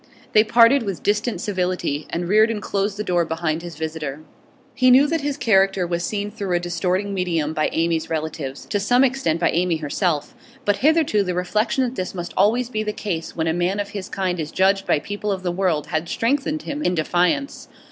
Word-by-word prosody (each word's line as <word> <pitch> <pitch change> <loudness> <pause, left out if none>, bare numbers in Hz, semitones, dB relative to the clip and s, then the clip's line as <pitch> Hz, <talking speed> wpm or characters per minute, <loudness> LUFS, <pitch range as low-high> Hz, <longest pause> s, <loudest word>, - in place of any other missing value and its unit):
They 215 - +6
parted 235 +4 +5
with 200 -5 -4
distant 210 +3 0
civility, 180 -6 -2
and 175 +1 -3
Reardon 215 +3 +3
closed 200 0 -2
the 210 - -2
door 175 -4 +1
behind 160 0 -2
his 170 -1 -8
visitor. 155 -2 -5 0.5
He 255 +1 +3
knew 260 +3 +7
that 325 +1 -1
his 285 0 -2
character 195 -6 +3
was 170 0 -2
seen 205 +2 -3
through 200 -4 -2
a - - +2
distorting 180 +3 -1
medium 165 -5 -1
by 155 -1 0
Amy's 165 -1 0
relatives, 155 -4 -4
to 205 - +1
some 245 +6 +3
extent 255 -11 +1
by 170 - +2
Amy 175 0 +1
herself; 155 +1 -1 0.3
but 205 0 +2
hitherto 300 -5 +3
the 180 -2 -2
reflection 215 +8 0
that 245 -1 -2
this 185 -6 -4
must 175 -1 -5
always 230 +6 +3
be 220 -3 -3
the 210 0 -2
case 165 -7 -4
when 160 - -1
a 160 - +1
man 175 +4 0
of 205 0 -3
his 200 -2 -6
kind 185 -2 -2
is 155 -1 -3
judged 195 +1 +2
by - - +3
people 205 +6 -4
of 190 -1 -3
the 175 - 0
world 175 -5 0
had 160 +2 -3
strengthened 290 +5 0
him 290 +1 -4
in 180 -10 +1
defiance. 180 - 0
190 Hz, 210 wpm, -22 LUFS, 170-215 Hz, 0.5 s, knew